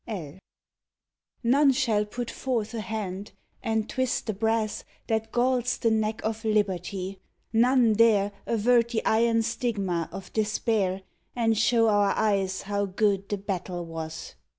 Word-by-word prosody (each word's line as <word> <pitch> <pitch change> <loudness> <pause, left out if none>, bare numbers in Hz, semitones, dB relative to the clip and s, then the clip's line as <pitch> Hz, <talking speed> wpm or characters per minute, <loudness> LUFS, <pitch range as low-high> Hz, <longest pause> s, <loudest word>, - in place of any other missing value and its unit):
L 185 -7 -6 1.0
NONE 275 +4 +5
shall 220 -5 +1
put 240 +3 -5
forth 235 -4 -2
a 225 - -3
hand 205 -3 -5 0.3
and 220 -1 -1
twist 260 -2 -1
the 215 - -2
brass 220 +1 -1 0.2
That 220 0 -1
galls 245 0 +1
the 230 - +1
neck 220 0 0
of 220 0 -3
Liberty, 195 -3 -1 0.3
none 240 0 +4
dare 210 -2 +4 0.2
Avert 235 +1 +3
the 235 -2 -2
iron 230 +1 +3
stigma 200 -8 -2
of 190 +2 -9
despair 210 -3 0 0.3
And 225 -2 +2
show 230 +1 +3
our 205 -2 +3
eyes 195 -3 0
how 200 0 -1
good 195 0 0
the 205 - -1
battle 185 -3 -4
was. 160 -1 -7
215 Hz, 140 wpm, -27 LUFS, 195-230 Hz, 1.0 s, NONE